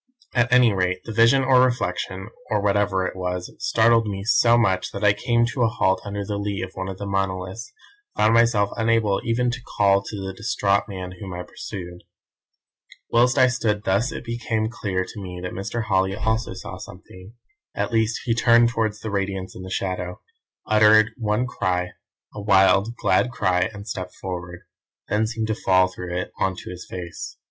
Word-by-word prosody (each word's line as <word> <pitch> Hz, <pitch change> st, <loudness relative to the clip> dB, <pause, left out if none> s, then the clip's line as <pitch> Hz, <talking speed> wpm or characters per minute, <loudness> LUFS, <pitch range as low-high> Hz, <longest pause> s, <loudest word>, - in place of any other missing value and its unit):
"At 120 Hz, -1 st, +2 dB
any 125 Hz, -3 st, +5 dB
rate 90 Hz, -1 st, -1 dB
the -, -, -7 dB
vision 115 Hz, +5 st, +4 dB
or 130 Hz, -1 st, +5 dB
reflection, 115 Hz, -5 st, -1 dB, 0.2 s
or 105 Hz, -, +1 dB
whatever 100 Hz, -2 st, +1 dB
it -, -, -4 dB
was, 90 Hz, -1 st, -4 dB
startled 115 Hz, 0 st, +3 dB
me 100 Hz, -1 st, -4 dB
so 115 Hz, +1 st, +4 dB
much 95 Hz, -6 st, +1 dB
that 100 Hz, -, -5 dB
I 105 Hz, -1 st, +5 dB
came 120 Hz, +3 st, +1 dB
to 130 Hz, -, -2 dB
a 115 Hz, -, +5 dB
halt 95 Hz, -4 st, +1 dB
under 100 Hz, 0 st, -4 dB
the 100 Hz, 0 st, -3 dB
lee 100 Hz, -2 st, -3 dB
of 95 Hz, -, -6 dB
one 95 Hz, 0 st, -5 dB
of 95 Hz, -, -6 dB
the 100 Hz, -, -6 dB
monoliths, 95 Hz, +2 st, -3 dB, 0.4 s
and -, -, -2 dB
found 110 Hz, +1 st, +5 dB
myself 115 Hz, -3 st, +3 dB
unable 115 Hz, -3 st, +2 dB
even 120 Hz, +1 st, +1 dB
to 125 Hz, 0 st, -6 dB, 0.2 s
call 100 Hz, -1 st, +4 dB
to 105 Hz, -, -8 dB
the 95 Hz, 0 st, -5 dB
distraught 100 Hz, -2 st, 0 dB
man 95 Hz, -2 st, -7 dB
whom 95 Hz, -3 st, -7 dB
I 90 Hz, -, -5 dB
pursued. 90 Hz, -1 st, -8 dB, 1.1 s
"Whilst 125 Hz, +3 st, +3 dB
I 130 Hz, -, +7 dB
stood 110 Hz, -4 st, 0 dB
thus 100 Hz, +9 st, +1 dB
it -, -, -6 dB
became 115 Hz, -2 st, -2 dB
clear 95 Hz, -5 st, -2 dB
to 105 Hz, -, -9 dB
me 90 Hz, -2 st, -7 dB
that 90 Hz, -, -4 dB
Mr. 100 Hz, +5 st, -3 dB
Holly 95 Hz, -2 st, +1 dB
also 110 Hz, +2 st, -1 dB
saw -, -, -8 dB
something. 95 Hz, +4 st, -12 dB, 0.4 s
At -, -, -2 dB
least 110 Hz, -1 st, +1 dB
he 115 Hz, -, +2 dB
turned 120 Hz, 0 st, +5 dB
towards 110 Hz, -3 st, -2 dB
the 110 Hz, -, -5 dB
Radiance 95 Hz, -2 st, -3 dB
in -, -, -8 dB
the 95 Hz, -, -8 dB
shadow, 90 Hz, -1 st, -3 dB, 0.5 s
uttered 110 Hz, 0 st, +5 dB
one 110 Hz, 0 st, 0 dB
cry; 90 Hz, -6 st, -1 dB, 0.4 s
a 105 Hz, -, -7 dB
wild, 100 Hz, +2 st, +4 dB
glad 125 Hz, -, +2 dB
cry, 90 Hz, -6 st, +1 dB
and 100 Hz, 0 st, -10 dB
stepped 90 Hz, -3 st, -5 dB
forward; 90 Hz, -2 st, -6 dB, 0.5 s
then 110 Hz, +1 st, +1 dB
seemed 110 Hz, 0 st, -3 dB
to 110 Hz, -, -1 dB
fall 95 Hz, -3 st, +3 dB
through 90 Hz, -1 st, -6 dB
it 90 Hz, -, -4 dB
on 95 Hz, -1 st, +1 dB
to -, -, -8 dB
his 90 Hz, 0 st, -9 dB
face. 90 Hz, -2 st, -7 dB
100 Hz, 190 wpm, -23 LUFS, 95-115 Hz, 1.1 s, I